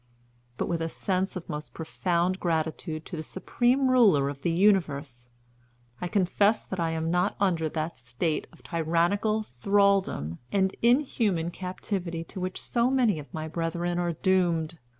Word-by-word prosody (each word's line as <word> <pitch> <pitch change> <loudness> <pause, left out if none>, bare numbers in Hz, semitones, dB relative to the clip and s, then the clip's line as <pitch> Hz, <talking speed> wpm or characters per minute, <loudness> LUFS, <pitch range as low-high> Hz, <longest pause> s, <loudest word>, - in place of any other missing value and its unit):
But, - - -1
with 170 -1 -1
a 165 - -1
sense 190 +3 -1
of 180 - -6
most 150 0 -6
profound 175 +2 -1
gratitude 160 -1 -2
to 180 - -6
the 155 - -4
Supreme 245 - +1
Ruler 205 - +5
of 140 -1 -7
the 175 - 0
universe, 155 - +1 0.7
I 180 - -1
confess 200 +3 +2
that 190 - -5
I 165 -1 +1
am 160 0 -1
not 180 +1 +1
under 170 -5 +1
that 160 +1 -4
state 125 +7 -2
of - - -20
tyrannical 170 +7 +1
thraldom 195 - +1
and 190 -1 +1
inhuman 230 - +2
captivity 180 -2 -4
to 185 +4 -9
which 185 0 -3
so 235 +1 +1
many 245 -10 +2
of 145 - -11
my 155 0 -4
brethren 170 +2 -2
are 175 -1 0
doomed. 170 -2 +1
175 Hz, 155 wpm, -27 LUFS, 160-195 Hz, 0.7 s, Ruler